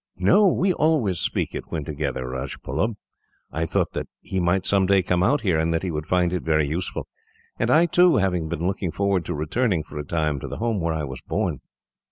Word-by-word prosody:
"No, 100 Hz, -, +5 dB
we 185 Hz, +1 st, +2 dB
always 140 Hz, -, +1 dB
speak -, -, -1 dB
it -, -, -5 dB
when 75 Hz, -3 st, -4 dB
together, 70 Hz, -4 st, -3 dB
Rajbullub. 70 Hz, -, -3 dB, 0.6 s
I 80 Hz, +1 st, -2 dB
thought -, -, 0 dB
that -, -, -3 dB
he 95 Hz, -, -3 dB
might, 90 Hz, +1 st, +1 dB
some 95 Hz, -2 st, +3 dB
day, 100 Hz, -1 st, +4 dB
come 90 Hz, 0 st, +1 dB
out 140 Hz, +10 st, +3 dB
here, 90 Hz, -8 st, +1 dB
and 80 Hz, +1 st, +1 dB
that 80 Hz, -, -1 dB
he 90 Hz, -, -2 dB
would 75 Hz, -1 st, -4 dB
find 90 Hz, -1 st, +2 dB
it 90 Hz, -, -1 dB
very 80 Hz, -2 st, +1 dB
useful; 85 Hz, +6 st, -3 dB, 0.5 s
and -, -, +1 dB
I, 165 Hz, +2 st, +5 dB
too, 175 Hz, +1 st, +4 dB
have 95 Hz, -2 st, +2 dB
been 85 Hz, -1 st, -2 dB
looking 95 Hz, -1 st, -1 dB
forward 100 Hz, 0 st, 0 dB
to 85 Hz, -, -3 dB
returning, 85 Hz, +4 st, 0 dB
for 75 Hz, -, -8 dB
a -, -, -3 dB
time, 75 Hz, -1 st, -1 dB
to -, -, -6 dB
the -, -, -6 dB
home 115 Hz, -2 st, -1 dB
where 85 Hz, -1 st, -1 dB
I 80 Hz, -, -2 dB
was 65 Hz, -3 st, -6 dB
born." -, -, -2 dB
90 Hz, 225 wpm, -24 LUFS, 80-100 Hz, 0.6 s, No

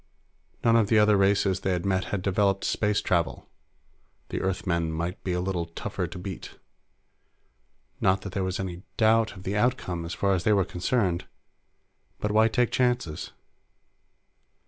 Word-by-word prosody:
None 115 Hz, 0 st, +4 dB
of 115 Hz, -3 st, +4 dB
the 110 Hz, -, +3 dB
other 105 Hz, 0 st, +5 dB
races 100 Hz, -1 st, +2 dB
they 95 Hz, -, 0 dB
had 90 Hz, 0 st, -2 dB
met 95 Hz, -1 st, +1 dB
had 95 Hz, -3 st, -3 dB
developed 100 Hz, 0 st, +1 dB
space 105 Hz, -1 st, +1 dB
travel; 85 Hz, -9 st, -1 dB, 0.8 s
the -, -, -3 dB
Earthmen 85 Hz, -3 st, -1 dB
might 85 Hz, +4 st, -4 dB
be 90 Hz, -, -1 dB
a 90 Hz, -, 0 dB
little 90 Hz, -2 st, -2 dB
tougher 85 Hz, -, -4 dB
to -, -, -9 dB
beat. 95 Hz, 0 st, -7 dB, 1.4 s
Not 95 Hz, 0 st, +2 dB
that 100 Hz, -, -7 dB
there 95 Hz, 0 st, -2 dB
was 95 Hz, 0 st, -2 dB
any 90 Hz, -2 st, -4 dB, 0.2 s
doubt 110 Hz, 0 st, +3 dB
of 95 Hz, -, -11 dB
the 95 Hz, +2 st, -2 dB
outcome, 105 Hz, -7 st, 0 dB
as 85 Hz, +1 st, -5 dB
far 100 Hz, -1 st, +1 dB
as 90 Hz, -3 st, 0 dB
they 105 Hz, -, +4 dB
were 100 Hz, -3 st, +3 dB
concerned 95 Hz, -1 st, -1 dB, 0.9 s
but 105 Hz, -, -1 dB
why 110 Hz, +1 st, +5 dB
take 120 Hz, +1 st, +1 dB
chances? 120 Hz, -11 st, 0 dB
95 Hz, 165 wpm, -27 LUFS, 90-105 Hz, 1.4 s, other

